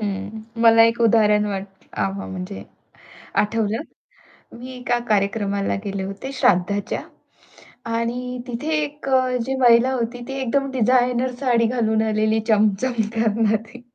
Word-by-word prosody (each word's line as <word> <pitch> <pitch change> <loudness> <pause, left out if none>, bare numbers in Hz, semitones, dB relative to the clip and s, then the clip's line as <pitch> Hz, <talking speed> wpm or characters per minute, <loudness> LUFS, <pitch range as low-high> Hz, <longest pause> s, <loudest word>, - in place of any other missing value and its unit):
हं, 205 +1 -4 0.2
मला 225 -1 +7
एक 230 +1 +1
उदाहरण 210 -2 +4
वाट 195 -1 -3 0.3
आ 100 -2 -1
म्हणजे 95 -1 -6 0.8
आठवलं. 220 +1 -1 0.8
मी 255 +2 -8
एका 245 -1 -1
कार्यक्रमाला 200 -1 0
गेले 195 -1 -3
होते 195 +8 -6
श्राद्धाच्या 200 -4 +1 0.9
आणि 245 +2 -3
तिथे 245 +5 -4
एक 295 -1 -6
अ, 255 -1 +2
जी 265 +1 -2
महिला 240 +1 +5
होती, 240 -1 -3
ती 270 - -5
एकदम 275 +2 0
डिझायनर 250 0 +2
साडी 240 -4 +2
घालून 220 -2 +1
आलेली 215 0 +1
चमचम 215 +3 +2 0.2
करणारी. 225 +1 0
225 Hz, 125 wpm, -22 LUFS, 205-250 Hz, 0.9 s, मला